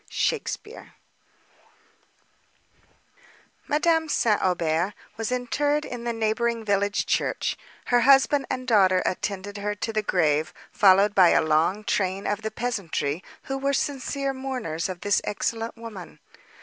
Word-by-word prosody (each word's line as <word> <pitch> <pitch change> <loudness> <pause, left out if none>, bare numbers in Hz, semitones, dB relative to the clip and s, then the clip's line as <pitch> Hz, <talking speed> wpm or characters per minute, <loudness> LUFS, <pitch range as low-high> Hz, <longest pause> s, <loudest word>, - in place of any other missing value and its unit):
SHAKESPEARE 465 - -3 2.7
Madame 320 +1 +2
St. 220 -7 +2
Aubert 175 +1 0 0.2
was 225 +1 -3
interred 290 +4 0
in 240 -1 -7
the 235 - 0
neighbouring 225 +1 -1
village 200 0 +1
church; - - -1 0.3
her 245 - +3
husband 275 +2 +4
and 255 0 -4
daughter 190 -5 +4
attended 200 +2 -3
her 205 +1 -2
to 225 +2 -4
the 215 - +1
grave, 155 -6 +1 0.2
followed 200 +1 +5
by 185 -3 +6
a - - +4
long 160 +7 +1
train 195 -1 -1
of 205 +1 -1
the 220 - -3
peasantry, 195 -9 -3 0.2
who 270 0 -4
were 275 +1 0
sincere 275 0 -2
mourners 255 -12 -4
of 180 -2 -6
this 205 -1 +2
excellent 225 +3 -3
woman. 225 -6 -9
215 Hz, 130 wpm, -25 LUFS, 190-250 Hz, 2.7 s, by